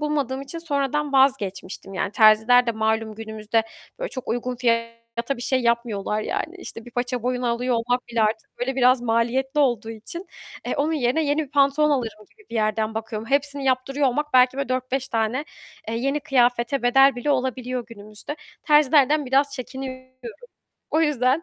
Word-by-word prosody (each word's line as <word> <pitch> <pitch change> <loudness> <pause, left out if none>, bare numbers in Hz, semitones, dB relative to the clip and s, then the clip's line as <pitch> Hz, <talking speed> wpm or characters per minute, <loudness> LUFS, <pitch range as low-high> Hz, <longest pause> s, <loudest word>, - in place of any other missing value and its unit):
bulmadığım 280 -3 -1
için 305 +5 -7
sonradan 295 -2 -1
vazgeçmiştim. 200 -8 0
Yani, 195 +1 -2
terziler 220 +3 +5
de 235 - +1
malum 220 0 -1
günümüzde, 220 0 -2 0.4
böyle, - - -3
çok 255 - -8
uygun 245 +1 -2
fiyata 230 +1 -2
bir 240 - -7
şey 260 0 +1
yapmıyorlar. 235 -3 0
Yani, 330 - -3
işte, 230 -10 -9
bir 245 - -12
paça 245 0 -2
boyunu 250 0 -1
alıyor 245 +1 0
olmak 245 +2 -1
bile 230 -2 0
artık 220 +1 -2
böyle 260 +2 -2
biraz 255 0 +4
maliyetli 245 +5 +1
olduğu 240 -5 +1
için, 340 - -8 0.4
e, - - -2
onun 300 +3 +1
yerine 270 +1 +1
yeni 295 +2 +1
bir 275 - -18
pantolon 285 +1 +3
alırım 225 -6 -2
gibi 430 -2 -24
bir - - -8
yerden 215 0 0
bakıyorum. 220 0 -5
Hepsini 280 0 0
yaptırıyor 270 +2 +1
olmak 295 +4 -1
belki 255 +1 +5
böyle 275 - -2
4-5 255 +1 -2
tane, 230 +4 -1 0.4
eee, 225 - -2
yeni 275 +5 -1
kıyafete 245 -1 +1
bedel 270 +2 +5
bile 245 +4 -1
olabiliyor 255 -2 -1
günümüzde. 215 +5 -9 0.3
Terzilerden 295 -1 +4
biraz 275 +2 +2
çekiniyorum. 260 0 -7 0.8
O 315 - +2
yüzden, 285 -1 +2
250 Hz, 170 wpm, -23 LUFS, 230-275 Hz, 0.8 s, terziler